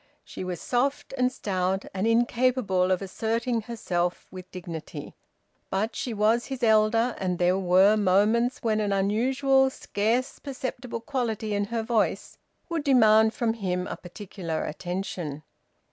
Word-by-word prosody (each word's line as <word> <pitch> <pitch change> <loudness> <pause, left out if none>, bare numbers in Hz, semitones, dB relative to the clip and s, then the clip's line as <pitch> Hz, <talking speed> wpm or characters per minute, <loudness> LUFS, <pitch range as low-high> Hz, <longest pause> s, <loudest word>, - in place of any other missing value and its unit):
She - - -8
was 180 -2 -4
soft 270 - -1
and 255 -1 +2
stout, 190 -5 -1
and 195 +3 -1
incapable 235 -5 +2
of 185 +1 +1
asserting 225 +4 -1
herself 180 -6 -2
with 185 -1 -10
dignity; 170 -4 -7 0.6
but 215 +4 -1
she 250 - -3
was 220 +2 +2
his 265 -2 -5
elder, 225 +2 +3
and 180 -2 -1
there 180 +2 +2
were 190 +3 +5
moments 210 +5 +2
when 220 -2 +1
an 205 -1 0
unusual, 260 +7 +2
scarce 240 +2 -1
perceptible 255 -3 -5
quality 225 -5 -2
in 205 0 0
her 225 +1 -2
voice 225 -1 -1 0.3
would 335 -3 -2
demand 220 -5 +5
from 235 -4 0
him 180 -5 -2
a - - -5
particular 175 -3 -6
attention. 175 -3 -4
215 Hz, 140 wpm, -26 LUFS, 185-240 Hz, 0.6 s, were